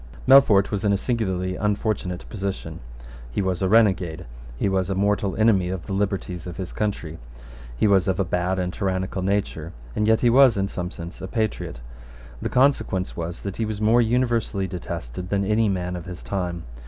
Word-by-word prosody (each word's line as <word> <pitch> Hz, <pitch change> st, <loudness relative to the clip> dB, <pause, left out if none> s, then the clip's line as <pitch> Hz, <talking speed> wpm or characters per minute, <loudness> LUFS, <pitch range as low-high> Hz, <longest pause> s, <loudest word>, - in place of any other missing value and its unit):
Melfort 125 Hz, -8 st, +6 dB
was 105 Hz, -1 st, -2 dB
in 105 Hz, -, +3 dB
a 100 Hz, -, +3 dB
singularly 95 Hz, -6 st, -1 dB
unfortunate 105 Hz, -3 st, -2 dB
position. 100 Hz, -2 st, -5 dB, 0.5 s
He -, -, -3 dB
was 95 Hz, -2 st, -1 dB
a 95 Hz, -, +1 dB
renegade: 95 Hz, -6 st, +3 dB, 0.3 s
he -, -, 0 dB
was 95 Hz, -1 st, 0 dB
a 95 Hz, -, 0 dB
mortal 100 Hz, 0 st, +1 dB
enemy 105 Hz, -5 st, +3 dB
of 90 Hz, -3 st, -4 dB
the 100 Hz, -, -4 dB
liberties 95 Hz, -3 st, -2 dB
of 85 Hz, -, -7 dB
his 95 Hz, -2 st, -5 dB
country: 85 Hz, -7 st, -3 dB, 0.6 s
he -, -, +2 dB
was 100 Hz, -2 st, +4 dB
of 95 Hz, 0 st, 0 dB
a 95 Hz, -, +2 dB
bad 90 Hz, +2 st, 0 dB
and 90 Hz, -1 st, -2 dB
tyrannical 95 Hz, -1 st, -2 dB
nature; 95 Hz, -4 st, -2 dB, 0.2 s
and 105 Hz, -, +1 dB
yet 110 Hz, 0 st, +4 dB
he 120 Hz, -, +4 dB
was, 130 Hz, -3 st, +6 dB
in 95 Hz, 0 st, +1 dB
some 90 Hz, -2 st, -4 dB
sense, 85 Hz, -1 st, -9 dB
a 95 Hz, -, -4 dB
patriot. 110 Hz, -, -2 dB, 0.6 s
The -, -, -2 dB
consequence 125 Hz, -8 st, +1 dB
was 85 Hz, +1 st, -5 dB
that 100 Hz, -2 st, -5 dB
he 115 Hz, -, 0 dB
was 105 Hz, -1 st, -4 dB
more 110 Hz, +3 st, +4 dB
universally 115 Hz, -4 st, +1 dB
detested 85 Hz, -3 st, -6 dB
than 100 Hz, 0 st, +1 dB
any 105 Hz, +1 st, +2 dB
man 90 Hz, -2 st, -2 dB
of 90 Hz, -, -7 dB
his 90 Hz, -2 st, -8 dB
time. 90 Hz, -3 st, -3 dB
95 Hz, 190 wpm, -24 LUFS, 90-105 Hz, 0.6 s, Melfort